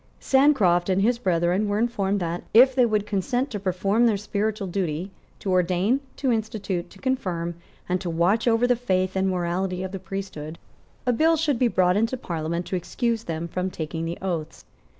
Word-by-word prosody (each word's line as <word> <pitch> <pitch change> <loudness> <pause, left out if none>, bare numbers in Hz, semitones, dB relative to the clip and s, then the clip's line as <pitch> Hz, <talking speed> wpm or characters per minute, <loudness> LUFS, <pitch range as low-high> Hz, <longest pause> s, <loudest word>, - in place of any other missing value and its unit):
Sancroft 250 -11 +3
and 190 +1 +2
his 235 +2 +2
brethren 180 0 +1
were 205 - 0
informed 205 -4 0
that, 170 0 -2
if 260 +3 +8
they 250 -2 +4
would 210 -2 0
consent 245 +7 -1
to 210 - -3
perform 195 +5 +1
their 215 -3 +2
spiritual 210 +1 -2
duty, 180 0 -2 0.3
to 195 - -3
ordain, 185 +7 +2 0.2
to 265 -3 0
institute, 210 -5 -2
to - - -16
confirm, 185 -9 -2 0.3
and 180 0 0
to 175 - -3
watch 175 +8 +2
over 230 +1 +4
the 245 0 +3
faith 185 -6 0
and 190 0 +1
the - - +1
morality 180 +1 -1
of 190 - -5
the 195 - -5
priesthood, 175 -4 -6 0.5
a 250 - +2
bill 320 +7 +4
should 295 -6 0
be 250 - +4
brought 185 -4 +2
into 225 +4 0
Parliament 170 -4 -3
to 180 - -3
excuse 230 +5 -2
them 165 0 -3
from 180 +2 -2
taking 160 -1 -4
the 165 +1 -4
oaths. 165 -4 -4
195 Hz, 190 wpm, -24 LUFS, 175-230 Hz, 0.5 s, if